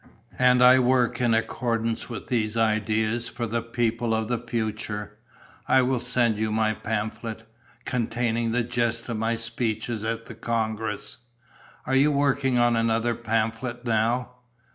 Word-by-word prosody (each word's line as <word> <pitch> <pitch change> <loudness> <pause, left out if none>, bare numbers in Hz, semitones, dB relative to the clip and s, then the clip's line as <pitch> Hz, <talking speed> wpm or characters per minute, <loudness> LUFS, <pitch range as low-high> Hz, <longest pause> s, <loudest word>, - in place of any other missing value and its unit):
And 125 0 +5
I 125 +1 +8
work 125 -1 +2
in 120 -2 +3
accordance 115 0 -1
with 115 -4 -6
these 115 -2 -1
ideas 110 +1 +1
for 120 - -4
the 115 +1 -1
people 115 0 -1
of 110 0 -2
the 120 -2 0
future. 110 -3 -4 0.5
I 130 -1 +5
will 125 0 +1
send 120 -3 +1
you 110 0 0
my 110 0 +1
pamphlet, 110 +1 -4 0.4
containing 115 -1 -1
the 120 +1 +1
gist 115 -1 -1
of 115 - -2
my 115 +1 0
speeches 115 -1 -2
at 115 +1 -3
the - - -9
congress. 110 -2 -3 0.7
Are 130 - -2
you 140 +3 +5
working 140 -2 +2
on 120 0 +4
another 115 +1 +1
pamphlet 115 +2 -2
now?" 120 +2 0
115 Hz, 145 wpm, -25 LUFS, 110-120 Hz, 0.7 s, I